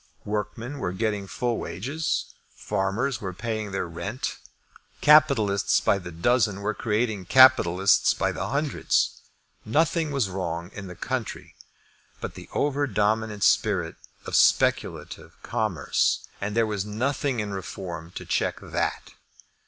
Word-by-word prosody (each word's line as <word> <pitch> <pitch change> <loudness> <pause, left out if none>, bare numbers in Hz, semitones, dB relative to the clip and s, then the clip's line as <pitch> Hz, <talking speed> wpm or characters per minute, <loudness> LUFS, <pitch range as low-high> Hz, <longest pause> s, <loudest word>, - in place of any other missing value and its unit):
Workmen 110 +6 -4
were 90 -6 -2
getting 105 -1 -2
full 120 +3 -2
wages. 140 - -3 0.2
Farmers 110 +7 -1
were 95 -3 -4
paying 110 +1 -3
their 95 -2 -2
rent. 100 +9 -4 0.6
Capitalists 110 -10 +5
by 100 - +2
the 90 -2 -8
dozen 100 +3 +1
were 105 +1 -1
creating 105 -3 -1
capitalists 100 -6 +5
by - - 0
the - - -4
hundreds. 145 +1 0 0.4
Nothing 160 +6 +1
was 135 -7 0
wrong 90 -1 -4
in 100 -2 -7
the 90 - -9
country, - - -4 0.7
but - - -5
the - - -11
over 145 0 +1
dominant 105 -2 0
spirit 95 -7 +2 0.3
of - - -3
speculative - - +1
commerce; 110 -6 0 0.2
and 105 +1 -3
there 115 - +4
was 105 -3 -2
nothing 130 +4 -1
in 105 -2 -3
Reform 90 -3 -6
to - - -6
check - - 0
that. - - -3
105 Hz, 130 wpm, -25 LUFS, 95-125 Hz, 0.7 s, Capitalists